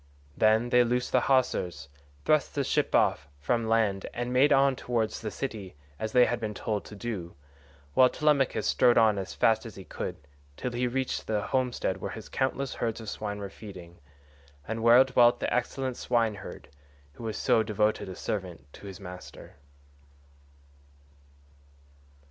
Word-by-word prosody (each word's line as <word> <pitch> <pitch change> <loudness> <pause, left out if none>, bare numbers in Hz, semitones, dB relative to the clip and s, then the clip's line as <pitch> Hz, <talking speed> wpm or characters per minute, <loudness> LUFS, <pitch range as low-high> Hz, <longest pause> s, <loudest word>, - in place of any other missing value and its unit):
Then 110 +2 +3
they 125 0 +5
loosed 125 +1 -1
the - - +4
hawsers, 90 - +1 0.4
thrust 155 -2 +2
the 140 - +1
ship - - 0
off 70 - +2
from 115 - -1
land, 105 -4 +1
and 120 +1 -3
made 135 +3 +4
on 135 -1 +4
towards 115 -3 -2
the 110 - -3
city 105 - -6 0.2
as 110 0 -3
they 125 +1 +6
had 120 - -1
been 110 -2 -4
told 105 -2 -3
to 105 - -10
do, 100 -6 -5 0.6
while 130 - +6
Telemachus 150 -3 +1
strode 125 -1 +4
on 110 -3 +4
as 95 0 -6
fast 110 -1 +3
as 115 -3 -9
he 95 - -9
could, - - -5 0.4
till 125 - -3
he 125 +1 -1
reached 130 +1 -2
the 105 -2 0
homestead 130 -2 -1
where - - -5
his - - -9
countless 135 0 -1
herds 115 -1 -3
of 110 -2 -6
swine 105 -1 -4
were 100 -1 -5
feeding, 90 -6 -11 0.7
and 115 +1 -3
where 120 +3 +7
dwelt 120 -2 +4
the - - -1
excellent 130 +1 -1
swineherd, 110 -5 -2 0.4
who - - -11
was 110 -1 -3
so 115 - +3
devoted 105 -2 0
a 95 - -7
servant 90 -10 -5
to 100 - -11
his 95 -2 -9
master. 90 -5 -11
115 Hz, 165 wpm, -28 LUFS, 105-125 Hz, 0.7 s, where